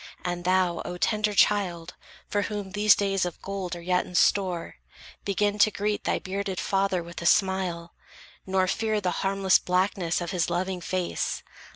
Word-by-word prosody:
And 175 0 -3
thou, 185 -2 +2
O 180 - -5
tender 210 +2 0
child, 180 -5 +2 0.3
for 205 - 0
whom 205 -2 -4
these 210 +1 +5
days 195 -1 0
Of 175 -2 -4
gold 190 -3 -4
are 170 - -8
yet 180 +1 +1
in 180 - -11
store, 180 -2 +1 0.5
begin 205 +1 0
to 215 - +6
greet 210 0 -2
Thy - - +1
bearded 195 0 -4
father 195 -2 0
with 170 0 -9
a 170 - 0
smile, 180 -3 +1 0.5
nor 190 0 +2
fear 215 +3 0
The 185 -3 -1
harmless 195 -1 +3
blackness 180 -1 0
of 175 0 -4
his 175 -3 0
loving 180 +1 -2
face. 180 +1 -2
190 Hz, 170 wpm, -26 LUFS, 175-200 Hz, 0.5 s, to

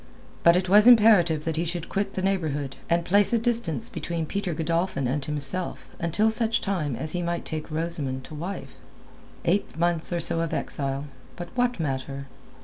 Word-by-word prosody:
But 170 0 +6
it 185 +1 +1
was 210 +4 +6
imperative 205 -10 +6
that 160 -1 -1
he 165 - +1
should 170 0 -3
quit 200 0 -2
the 185 - -2
neighbourhood, 155 -8 -1
and 170 0 +1
place 205 +4 +3
a - - +5
distance 225 - 0
between 165 0 -4
Peter 185 0 -3
Godolphin 165 -3 -1
and 135 +3 -1
himself 150 +5 -3
until 205 +7 +1
such 225 0 +2
time 165 - -2
as 155 +6 -1
he 180 - -1
might 170 0 -3
take 155 0 -4
Rosamund 155 -5 -2
to - - -11
wife. 155 -3 -6 0.7
Eight 185 -1 0
months 170 0 +1
or 175 - 0
so 165 0 +1
of 165 -1 -2
exile; 135 0 -3 0.3
but 175 -1 -7
what 245 -3 0
matter? 140 -2 -3
170 Hz, 180 wpm, -25 LUFS, 150-190 Hz, 0.7 s, But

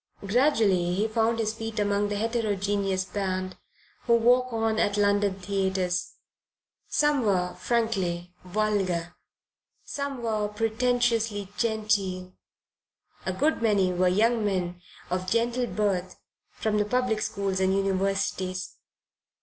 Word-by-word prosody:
Gradually 200 -7 +2
he 210 +3 +1
found 225 +1 +1
his 220 -1 0
feet 225 0 -6
among 205 0 +1
the 205 - -2
heterogeneous 205 -4 0
band 185 -1 -3 0.5
who 235 - +6
walk 250 +2 +3
on 225 -1 0
at 205 0 +1
London 205 -1 +2
theatres. 190 -2 -1 0.8
Some 295 -2 +2
were 185 -4 +1
frankly 190 -7 -1
vulgar, 185 -3 -1 0.7
some 280 -3 -4
were 215 -2 0
pretentiously 225 -1 0
genteel, 205 -5 -1 0.9
a - - +1
good 290 +9 +1
many 200 -5 +2
were 180 +1 +2
young 220 +5 +3
men 180 -3 -1 0.3
of 185 0 -1
gentle 240 +3 +1
birth 190 -5 -1 0.3
from 210 -1 -1
the 210 - +2
public 245 -1 0
schools 195 -3 -1
and 190 0 +2
universities. 190 -1 -1
205 Hz, 115 wpm, -27 LUFS, 185-225 Hz, 0.9 s, who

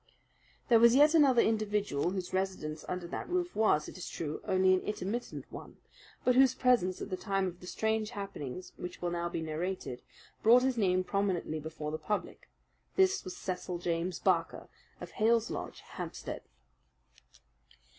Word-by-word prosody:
There 235 -3 +6
was 235 +1 +7
yet 295 +3 +6
another 275 -7 +6
individual 210 -8 0
whose 185 -1 -4
residence 185 -5 -2
under 180 -1 -3
that 170 - -5
roof 355 0 -1
was, 210 -9 +3
it - - -9
is - - -6
true, 155 -2 -4
only 185 0 +4
an 185 - +3
intermittent 210 +4 -4
one, - - -10 0.5
but 250 - +5
whose 260 +1 +5
presence 240 -8 +2
at 200 - -8
the - - 0
time 195 0 0
of 180 -1 -5
the 180 - -11
strange 220 +2 0
happenings 190 - -6
which 180 - -7
will 175 -1 -2
now 170 0 -2
be 165 - -3
narrated 160 -4 -4 0.4
brought 240 +3 +6
his 260 -1 +1
name 185 -4 +2
prominently 185 -5 -1
before 155 0 -5
the 155 - -3
public. 210 - -4 0.5
This 385 0 +3
was 180 -1 -7
Cecil 180 -1 -4
James 170 0 -2
Barker, 170 -4 0 0.3
of - - -8
Hales 230 +1 +2
Lodge, - - -5
Hampstead. - - -6
190 Hz, 165 wpm, -31 LUFS, 175-225 Hz, 0.5 s, was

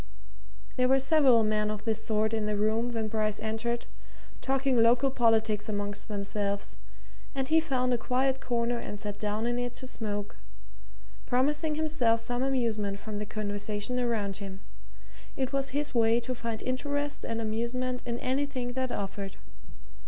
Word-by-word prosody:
There 255 0 +4
were 265 +1 +5
several 270 -4 +5
men 215 0 +1
of 215 0 -4
this 220 -1 0
sort 220 0 +1
in 220 -1 0
the 210 - 0
room 220 +3 +1
when 225 -2 -1
Bryce 215 -1 0
entered, 225 +2 -2 0.6
talking 265 -2 +2
local 245 +4 +5
politics 220 -3 +2
amongst 205 -1 -2
themselves, 200 -1 -2 0.6
and 265 -1 0
he 320 +2 +5
found 255 -5 +1
a 240 - +1
quiet 260 +3 +1
corner 240 0 0
and 205 - -6
sat 205 -1 -4
down 210 +1 -1
in 240 +1 0
it 245 0 -3
to 255 - -5
smoke, 205 -5 -4 0.9
promising 295 +5 +2
himself 295 -8 +2
some 245 +2 -2
amusement 230 -7 0
from 210 0 -5
the 210 - -4
conversation 205 +3 -2
around 220 -5 0
him; 195 -1 -7 0.8
it 265 0 -1
was 275 0 +1
his 290 +2 -2
way 230 -1 +4
to 255 +2 -3
find 230 -2 -4
interest 285 +3 -2
and 230 0 -2
amusement 235 +3 -1
in 235 -1 -2
anything 260 -2 -1
that 260 0 -1
offered. 195 -1 -4
235 Hz, 160 wpm, -29 LUFS, 215-255 Hz, 0.9 s, were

